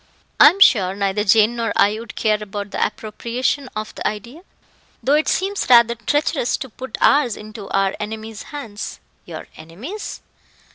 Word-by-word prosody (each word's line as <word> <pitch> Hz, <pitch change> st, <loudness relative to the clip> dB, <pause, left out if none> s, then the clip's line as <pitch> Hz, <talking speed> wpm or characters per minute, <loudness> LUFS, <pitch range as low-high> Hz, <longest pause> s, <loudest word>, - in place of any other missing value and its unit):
"I -, -, +10 dB
am 365 Hz, +5 st, -5 dB
sure 195 Hz, -, +5 dB
neither 200 Hz, +1 st, 0 dB
Jane 215 Hz, +3 st, +4 dB
nor 230 Hz, -1 st, -2 dB
I 210 Hz, +2 st, +3 dB
would 230 Hz, -1 st, -10 dB
care 215 Hz, -1 st, +1 dB
about 205 Hz, -1 st, -6 dB
the -, -, 0 dB
appropriation 235 Hz, +5 st, -2 dB
of 215 Hz, 0 st, -5 dB
the -, -, -3 dB
idea, 235 Hz, -, -6 dB, 0.6 s
though 275 Hz, -, +2 dB
it 305 Hz, +1 st, +2 dB
seems 390 Hz, +2 st, -1 dB
rather 235 Hz, -1 st, +6 dB
treacherous 290 Hz, +3 st, 0 dB
to 265 Hz, -, -7 dB
put 260 Hz, +4 st, -8 dB
ours 280 Hz, -6 st, +3 dB
into 215 Hz, -1 st, -10 dB
our 195 Hz, 0 st, +1 dB
enemy's 220 Hz, 0 st, -6 dB
hands." 230 Hz, -9 st, -7 dB, 0.3 s
"Your -, -, -8 dB
enemy's! 215 Hz, -, -8 dB
220 Hz, 160 wpm, -20 LUFS, 210-265 Hz, 0.6 s, I